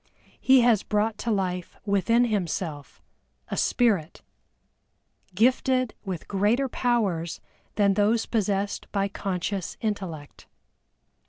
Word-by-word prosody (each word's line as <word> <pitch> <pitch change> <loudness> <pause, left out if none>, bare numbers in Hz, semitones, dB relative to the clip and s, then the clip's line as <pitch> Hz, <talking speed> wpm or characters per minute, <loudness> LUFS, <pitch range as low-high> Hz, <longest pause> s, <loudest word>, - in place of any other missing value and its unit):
He 260 -1 +5
has 235 -4 +4
brought 210 +1 -1
to 235 - -3
life 180 -4 -2
within 225 +4 +3
himself 175 -8 -3 0.5
a - - -2
Spirit, 200 -10 +1 1.1
gifted 255 +2 +2
with 185 -5 -5
greater 210 +7 +1
powers 210 -11 -1 0.4
than 200 -2 +3
those 215 +3 +2
possessed 200 -2 -1
by 200 -1 0
Conscious 190 -1 -3
Intellect. 165 - -5
205 Hz, 100 wpm, -26 LUFS, 185-230 Hz, 1.1 s, He